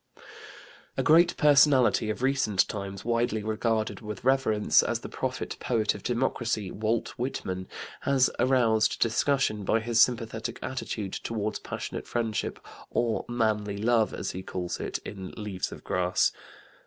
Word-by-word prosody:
" - - -20
A - - +1
great 170 +3 +5
personality 140 -6 +5
of 110 +4 -3
recent 130 -8 +2
times, 100 -1 -6
widely 115 -2 0
regarded 110 +1 -1
with 105 -2 -7
reverence 130 -5 +3
as - - -2
the - - -7
prophet - - -4
poet 110 -4 +1
of 105 - -9
Democracy 120 -5 -1
Walt 110 +2 -1
Whitman 95 -7 -3 0.3
has 135 -2 +3
aroused 120 -4 +3
discussion 115 -2 +1
by 110 - +2
his 115 0 +2
sympathetic 115 -2 +1
attitude 110 -6 -4
toward 110 -2 -3
passionate - - -5
friendship, 115 -3 -2 0.3
or 120 -2 0
"manly 105 -4 0
love" 110 +1 +2
as 95 - -4
he 95 - -6
calls 90 -1 -4
it, - - -3
in 95 -2 -7
Leaves 105 -4 -4
of - - -10
Grass. 90 0 +1
110 Hz, 140 wpm, -28 LUFS, 105-120 Hz, 0.3 s, great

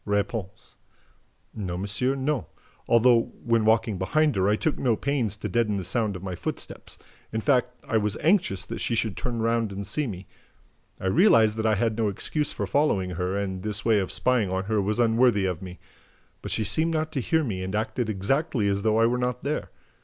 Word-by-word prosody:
R. 100 0 +2 1.3
"No, 95 -5 -4
monsieur, 105 +8 -1
no, 135 -1 -1 0.4
although, 120 0 +4
when 115 -2 +2
walking 110 -3 +2
behind 150 +8 +2
her, 95 +1 +2
I 105 - +3
took 155 +7 -1
no 120 -4 +2
pains 120 -4 -1
to - - -4
deaden 115 -3 +1
the 95 - -2
sound 105 +2 -1
of 90 - -8
my 95 -1 -4
footsteps. 85 - -6 0.3
In 110 - -1
fact, 125 0 +2 0.2
I 115 - +2
was 105 0 -1
anxious 160 - +1
that - - -6
she 115 - 0
should 110 -4 -1
turn 120 -2 -3
round 115 -2 +1
and 100 +1 -5
see 150 +5 -2
me. 95 -3 -7 0.7
I - - -7
realized 110 - +5
that 110 0 0
I 110 - +3
had 110 +2 0
no 110 - +2
excuse 145 +9 -1
for - - -3
following 105 -11 +1
her 90 +2 -2
and 95 -2 -3
that 105 - -5
this 105 -1 -2
way 110 -2 +4
of 95 - -2
spying 125 -6 +1
on 95 +1 -1
her 105 +1 0
was 105 +2 -1
unworthy 115 -3 +3
of 90 -3 -2
me. 90 -1 -8 0.6
But - - -6
she 110 - 0
seemed 160 - 0
not 155 0 -1
to 140 -4 -2
hear 160 +5 +1
me 100 -9 -3
and 95 +2 -3
acted 110 +2 -1
exactly 110 - 0
as 100 0 0
though 110 +1 +2
I 115 - +5
were 125 +2 +1
not 125 0 -2
there. 145 +3 -2
110 Hz, 215 wpm, -26 LUFS, 100-125 Hz, 1.3 s, realized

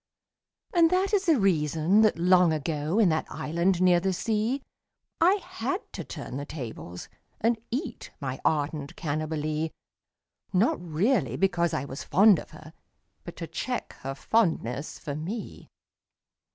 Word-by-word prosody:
And 335 -2 +5
that 375 +3 +1
is 395 -2 +2
the 315 -6 +5
reason 165 +1 +3
that 215 -6 +4
long 180 0 +5
ago. 155 +3 -1
In 215 -5 +5
that 155 -1 0
island 170 +3 0
near 180 -1 +5
the 190 +2 0
sea, 225 +7 -1 0.6
I 360 +4 +5
had 345 - -3
to - - -5
turn 130 - -7
the 140 - -4
tables 115 - -7 0.3
and 230 0 +1
eat 255 0 -4
My 135 -2 -4
ardent 145 -1 -1
Cannibalee 155 0 -2 0.5
— - - -63 0.3
Not 185 -1 +2
really 170 - +1
because 170 0 +1
I 130 - -2
was 135 +1 -7
fond 200 -3 +5
of - - -10
her, 155 0 -13 0.5
But - - -8
to - - -5
check - - -4
her 135 +1 -4
fondness 155 - 0
for 145 - -5
me. 185 +10 -6
170 Hz, 150 wpm, -27 LUFS, 150-220 Hz, 0.6 s, And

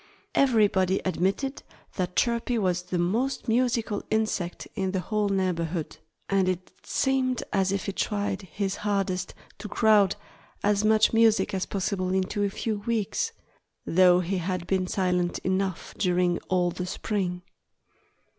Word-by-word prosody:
Everybody 205 -7 +3
admitted 195 +9 -1 0.3
that 180 -1 -2
Chirpy 235 0 +1
was 185 -4 +1
the 180 0 -3
most 225 +11 0
musical 230 -3 +1
insect 215 -5 -1
in 190 -1 -2
the 190 - +1
whole 210 +2 -1
neighborhood. 175 -4 -1 0.3
And 195 -2 +2
it 185 0 -3
seemed 260 -2 0
as 190 -1 +2
if 195 -1 -2
he - - -1
tried 205 0 -2
his 195 +2 -3
hardest 195 -3 -1 0.2
to 210 - -6
crowd 210 -3 +4 0.5
as 205 0 +2
much 215 +1 +4
music 225 -2 +4
as 190 -1 -1
possible 185 -1 -1
into 190 +2 -1
a 200 - +1
few 215 +1 -3
weeks, 230 - -1 0.5
though 180 0 +5
he 185 +2 -1
had 180 0 -2
been 185 0 0
silent 180 -2 0
enough 190 -1 -1
during 180 -2 +2
all 180 -1 +2
the 180 +1 -5
spring. 180 -2 -2
195 Hz, 140 wpm, -27 LUFS, 180-215 Hz, 0.5 s, though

